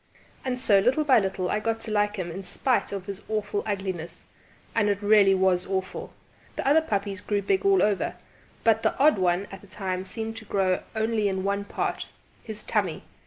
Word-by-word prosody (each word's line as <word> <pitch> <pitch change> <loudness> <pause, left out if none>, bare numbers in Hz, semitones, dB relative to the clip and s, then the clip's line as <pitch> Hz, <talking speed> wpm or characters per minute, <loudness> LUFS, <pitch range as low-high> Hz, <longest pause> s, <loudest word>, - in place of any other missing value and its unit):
And 255 -1 -2
so, 205 -6 +5
little 250 +9 +2
by 270 -5 +5
little, 190 -2 -2
I 210 - +1
got 225 +1 -1
to 220 - -3
like 205 0 +1
him 180 -4 -4
in 195 +4 -6
spite 255 +6 0
of 195 -2 -5
his 200 0 -6
awful 210 -1 -1
ugliness. 190 -5 -4 0.5
And 210 -2 +2
it 200 -1 0
really 205 -2 +5
was 185 -1 +2
awful! 190 -1 -3 0.4
The - - -4
other 300 +3 +5
puppies 200 -7 -2
grew 205 -1 -1
big 380 - +1
all 395 -1 +4
over, 205 -2 0 0.5
but 225 -1 +4
the - - 0
odd 285 -6 +4
one 180 +1 +1
at 195 -1 -9
that 200 - -17
time 185 -2 -3
seemed 225 +3 -4
to 225 - -9
grow 190 -3 +1 0.2
only 220 -1 +1
in 190 -1 -1
one 200 +1 -1
part - - -3 0.4
his 220 -2 -6
tummy! - - -1
205 Hz, 200 wpm, -26 LUFS, 190-220 Hz, 0.5 s, so